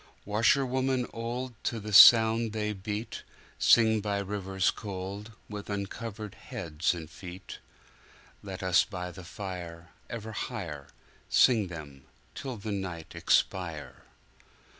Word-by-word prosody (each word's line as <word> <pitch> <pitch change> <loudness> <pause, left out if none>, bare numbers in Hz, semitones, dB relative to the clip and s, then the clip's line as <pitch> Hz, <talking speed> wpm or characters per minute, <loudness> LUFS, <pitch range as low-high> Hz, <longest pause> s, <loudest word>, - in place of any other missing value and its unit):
Washerwomen 130 +4 +2
old, 120 +2 -4
To 115 - -1
the 105 0 -6
sound 115 +1 +8
they 105 -1 -1
beat, 105 +3 -5 0.4
Sing 110 -2 +5
by 100 -1 -1
rivers 95 -1 0
cold, 100 +2 -6
With 105 -1 -7
uncovered 105 +1 -5
heads 80 +2 -2
and 80 -2 -7
feet. 90 +2 -10 0.8
Let 95 -1 -7
us 90 -2 +4
by 90 -4 -6
the 90 +2 -10
fire 90 -2 -7 0.2
Ever 110 -1 -6
higherSing 95 - 0
them 70 -5 -9 0.3
till 130 -3 -6
the 105 +1 -5
night 90 -5 -5
expire! 85 -5 0
100 Hz, 115 wpm, -29 LUFS, 90-110 Hz, 0.8 s, sound